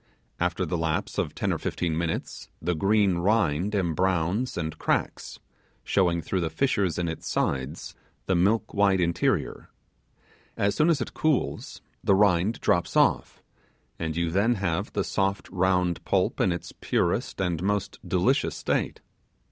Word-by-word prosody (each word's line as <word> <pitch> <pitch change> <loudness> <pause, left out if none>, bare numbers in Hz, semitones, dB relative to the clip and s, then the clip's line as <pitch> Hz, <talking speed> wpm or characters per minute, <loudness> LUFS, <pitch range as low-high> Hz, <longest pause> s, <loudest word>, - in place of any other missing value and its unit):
After 90 +1 0
the 85 +1 -2
lapse 80 -1 -1
of - - -2
ten - - 0
or - - -3
fifteen 85 -3 -2
minutes, 85 0 -3
the 90 +2 -1
green 100 +1 +2
rind 95 -1 +1
embrowns 90 +5 0
and 80 -2 -3
cracks, - - -1 0.5
showing 85 -4 +1
through 95 - -1
the 85 - -1
fissures 95 - 0
in 85 -1 -1
its 80 - -5
sides 70 +3 -2 0.3
the 95 - +1
milk 105 +5 +2
white 100 -2 +3
interior. 85 -1 0 0.9
As 100 0 +1
soon 155 +2 +3
as 165 - +2
it - - -4
cools 155 -4 -1 0.2
the 100 - +4
rind 100 +2 +3
drops 85 - +1
off, - - +2 0.6
and 80 -2 -3
you 85 -1 0
then 105 +7 +2
have 90 -6 -2
the - - 0
soft 95 0 -1
round 90 -2 +1
pulp - - +1
in 95 - +3
its 85 - -5
purest - - -1
and 90 -4 -1
most 100 0 -1
delicious 95 +10 +1
state. - - -2
90 Hz, 150 wpm, -26 LUFS, 85-100 Hz, 0.9 s, the